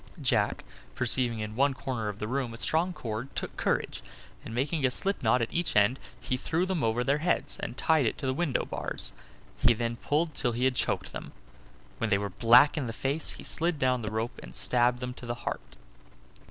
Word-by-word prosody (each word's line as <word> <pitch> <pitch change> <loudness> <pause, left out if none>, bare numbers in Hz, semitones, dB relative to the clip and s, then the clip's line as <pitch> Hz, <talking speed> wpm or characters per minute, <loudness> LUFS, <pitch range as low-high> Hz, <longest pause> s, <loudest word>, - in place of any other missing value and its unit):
Jack, 120 -7 +1 0.3
perceiving 120 -4 +1
in 105 0 -5
one 135 +2 +3
corner 125 -5 -3
of 105 - -6
the 105 - -4
room 125 -1 -2
a - - -7
strong 165 +8 +1
cord, 115 -5 -5
took - - -3
courage, - - -1 0.4
and - - -8
making 140 +6 -1
a 130 - +5
slip 195 +10 0
knot 115 +1 +3
at 115 - -4
each 175 0 0
end, 105 +5 +4 0.2
he 125 - -2
threw 165 +7 0
them 185 -5 -1
over 115 +2 +1
their 140 +3 +2
heads, 175 +3 0
and 125 - -5
tied 155 -6 +3
it - - -1
to 140 - -5
the 130 - +1
window 145 -2 0
bars; - - -3 0.5
he 120 -1 +5
then 115 +1 -2
pulled 155 +5 0
till 120 -3 0
he 120 +3 0
had 130 - +3
choked - - -1
them. - - -7 0.7
When 115 - 0
they 100 - +4
were 100 -1 -3
black 125 - +6
in 130 - -2
the 115 - -4
face 140 +6 -2
he - - -10
slid 170 0 0
down 130 -2 +2
the 110 - -3
rope 110 +2 -3
and - - -11
stabbed 125 0 +2
them 125 0 -3
to 125 - -10
the 120 - -2
heart. - - -4
125 Hz, 220 wpm, -29 LUFS, 115-145 Hz, 0.7 s, black